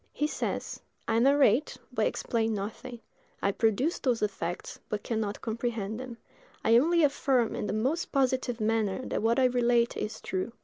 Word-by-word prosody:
He 295 - 0
says: 305 - -3 0.3
"I 225 0 +2
narrate, 275 0 +4 0.2
but - - +2
explain 225 -2 -1
nothing; 230 +4 -6 0.4
I 200 - +1
produced 225 - +1
those 245 -5 +1
effects, 180 -4 -3
but 210 -1 -3
can 225 -2 -1
not 205 -1 -4
comprehend 225 -2 -3
them; 255 -2 -7 0.5
I 230 +1 +6
only 335 +4 +3
affirm 270 -5 +2
in - - -3
the 195 - -2
most 265 +11 -1
positive 260 -3 +1
manner 220 +2 0
that - - -1
what 230 +2 +2
I 260 - +4
relate 240 -1 +2
is 215 - -4
true. 190 +5 -3
235 Hz, 170 wpm, -29 LUFS, 215-255 Hz, 0.5 s, I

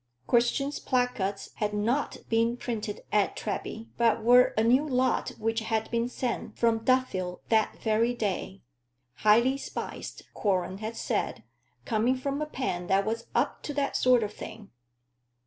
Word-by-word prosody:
Christian's 245 - +1
placards 245 -6 -1
had 210 -1 -1
not 235 +8 0
been 230 +1 +2
printed 220 -4 -4
at 210 -2 +2
Treby, 220 +1 -4
but 230 -1 +3
were 245 +2 +6
a 220 - +4
new 250 +5 +4
lot 260 -3 +1
which 225 +1 0
had 220 0 -2
been 235 +1 0
sent 250 -1 -3
from 230 -1 +3
Duffield 225 -8 0
that 220 -2 +2
very 230 +2 +1
day 195 -3 -3 0.5
"highly 235 +6 +4
spiced," - - -6
Quorlen 190 -2 0
had 220 +1 -5
said, - - -2 0.4
"coming 230 - +2
from 275 +3 -3
a 305 - -1
pen 180 -12 -3
that 195 +1 +3
was 230 +1 -3
up 250 +5 +1
to 295 - -5
that 280 -1 0
sort 250 -2 +4
of 210 - -4
thing." 215 -2 -9
230 Hz, 150 wpm, -28 LUFS, 210-250 Hz, 0.5 s, were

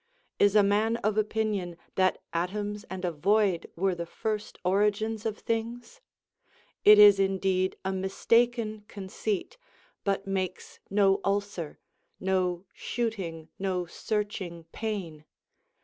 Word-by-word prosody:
Is 205 0 +4
a 210 - +7
man 215 +3 +2
of 215 -1 +2
opinion 210 -5 -1 0.2
that 185 -1 +1
atoms 205 +5 -2
and 185 -1 -4
a 175 - 0
void 190 +3 +2
were 190 +2 +1
the 170 -1 -5
first 215 +3 -4
origins 210 +3 +1
of 215 -1 -3
things 235 - -4 0.8
1 210 - +11
It - - +7
is 205 -1 +9
indeed 190 -1 +1
a 190 - 0
mistaken 215 +3 +1
conceit, 205 - -4 0.4
but 195 0 0
makes 190 -2 -3
no 195 -1 +3
ulcer, 200 -5 -2 0.4
no 185 -1 0
shooting, 190 -9 -3
no 185 -2 -1
searching 190 -3 -3
pain. 190 -9 -4
200 Hz, 120 wpm, -28 LUFS, 185-215 Hz, 0.8 s, 1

